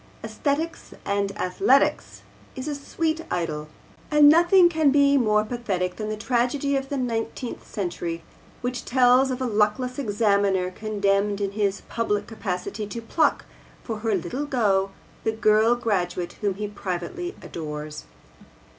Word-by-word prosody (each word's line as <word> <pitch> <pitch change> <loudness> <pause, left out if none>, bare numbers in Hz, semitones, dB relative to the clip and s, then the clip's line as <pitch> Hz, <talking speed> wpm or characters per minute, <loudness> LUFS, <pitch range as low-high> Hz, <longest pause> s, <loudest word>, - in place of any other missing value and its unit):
AEsthesis 310 +3 -2
and 200 0 0
Athletes 185 - +1 0.3
is 260 +2 -5
a 300 - -1
sweet 315 +3 -2
idyll, 155 -3 -2 0.4
and 300 -1 +6
nothing 345 +4 +7
can 315 -4 +3
be 280 0 +4
more 215 -5 +3
pathetic 195 -7 -2
than 215 -1 -4
the 215 - -3
Tragedy 250 +5 0
of 270 0 -2
the 280 - -2
XIX. 235 -1 -3
Century, 170 -4 -4 0.4
which 245 0 -3
tells 255 +1 +4
of 255 -1 -2
a - - 0
luckless 220 +4 0
examiner 200 -5 +1
condemned 200 0 0
in 200 -1 -1
his 200 -1 -1
public 210 -3 -2
capacity 210 -1 -4
to 235 - -5
pluck 295 +7 +1 0.4
for 225 -3 -4
her 220 -1 0
Little 220 - -3
go 200 -8 +2 0.3
the 220 - +1
girl 220 +2 +4
graduate 180 -7 -1
whom 200 -3 0
he 210 +1 -3
privately 205 - -5
adores. 150 - -6
215 Hz, 140 wpm, -24 LUFS, 195-265 Hz, 0.4 s, nothing